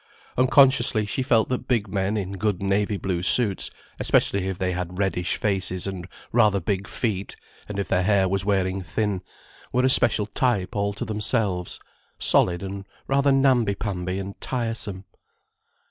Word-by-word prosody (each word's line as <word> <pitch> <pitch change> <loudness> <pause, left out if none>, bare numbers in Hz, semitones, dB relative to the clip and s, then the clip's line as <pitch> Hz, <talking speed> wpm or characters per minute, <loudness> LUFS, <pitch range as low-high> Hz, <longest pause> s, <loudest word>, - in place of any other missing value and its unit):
Unconsciously 130 -4 +4
she 105 - -2
felt 115 -4 +3
that 125 - -3
big 115 -5 +1
men 100 +2 -1
in 95 -2 -3
good 100 -1 -1
navy 100 +1 0
blue 95 -3 -2
suits, 100 0 +2 0.3
especially 95 -1 +2
if 95 -2 -3
they 95 -1 -1
had 90 0 -4
reddish 95 -3 0
faces 95 -3 0
and 95 -3 -5 0.2
rather 105 -4 +3
big 95 +2 -2
feet 100 -5 -3 0.3
and 105 - -5
if 100 - -2
their 90 -1 +1
hair 95 0 +3
was 95 +1 -1
wearing 95 -1 0
thin, 100 +2 -2 0.5
were 125 +1 +2
a - - +4
special 110 -4 +4
type 110 -2 -1
all 100 0 0
to 100 - -5
themselves, 105 -4 -1 0.4
solid 90 +1 +2
and 100 0 -6 0.2
rather 140 +1 +2
namby 130 -6 +3
pamby 95 -3 -3
and 100 0 -7
tiresome. 115 -6 -2
100 Hz, 160 wpm, -24 LUFS, 95-110 Hz, 0.5 s, Unconsciously